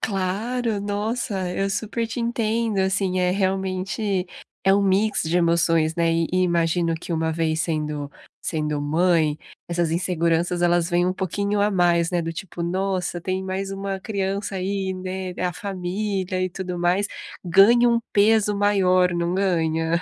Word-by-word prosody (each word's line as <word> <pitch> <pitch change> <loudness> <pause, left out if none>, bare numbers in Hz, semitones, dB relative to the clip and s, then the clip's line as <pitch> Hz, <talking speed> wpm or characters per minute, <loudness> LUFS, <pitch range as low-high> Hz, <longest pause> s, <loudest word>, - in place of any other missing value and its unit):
Claro. 210 +3 -1
Nossa, 205 -2 -2
eu 195 0 0
super 220 +3 -2
te 230 - -6
entendo, 230 -2 0
assim, 190 -1 +1
é 180 0 +2
realmente 190 0 -1 0.4
é 195 +1 +5
um 200 - +3
mix 200 +2 +2
de 165 +2 0
emoções, 165 -2 +2
né. 165 -1 +2
E 165 0 +1
e 185 0 +3
imagino 170 -1 +1
que 165 +1 -6
uma 160 0 0
vez 160 0 0
sendo 150 -3 -2 0.3
sendo 150 -2 -2
mãe, 160 0 +2 0.3
essas 170 -1 0
inseguranças 170 0 0
elas 175 -1 +3
vêm 175 0 +2
um 185 - +1
pouquinho 200 +2 -1
a 205 - +3
mais, 175 -3 +2
né, 175 -2 0
do 165 - -3
tipo: 170 0 -6
"Nossa, 185 0 -1
tem 185 +2 -2
mais 190 +1 -3
uma 195 0 -3
criança 195 -1 -3
aí, 190 0 -2
né, 185 0 -5
a 180 - 0
família 190 0 -3
e 185 - 0
tudo 180 -1 -5
mais". 180 +4 +2 0.4
Ganham 235 +7 +5
um 230 - +1
peso 210 0 +3
maior, 185 -3 +3
não 170 +1 -1
ganha? 165 -3 +1
185 Hz, 160 wpm, -23 LUFS, 170-200 Hz, 0.4 s, é